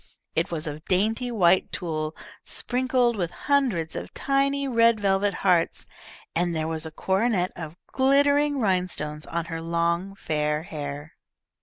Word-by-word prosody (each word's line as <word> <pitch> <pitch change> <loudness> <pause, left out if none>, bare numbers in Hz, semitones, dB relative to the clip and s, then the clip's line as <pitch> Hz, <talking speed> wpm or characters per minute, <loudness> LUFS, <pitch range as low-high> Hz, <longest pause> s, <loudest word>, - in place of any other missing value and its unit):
It 165 +3 +1
was 165 -2 -3
of 150 0 -5
dainty 220 +6 +1
white 185 -5 +3
tulle, 155 -2 -3 0.3
sprinkled 250 -1 +1
with 175 -5 -1 0.2
hundreds 240 - +1
of - - -5
tiny 275 0 +1
red 230 -3 +4
velvet 200 0 +1
hearts, 175 -3 +2 0.5
and 175 0 +1
there 155 0 -1
was 160 0 -2
a - - -8
coronet 190 +2 +1
of 160 0 -7
glittering 285 +2 +3
rhinestones 180 -7 -1
on 170 -1 -2
her 165 -1 -5
long 170 +3 0
fair 150 -3 -1
hair. 145 -1 -6
180 Hz, 140 wpm, -25 LUFS, 160-235 Hz, 0.5 s, red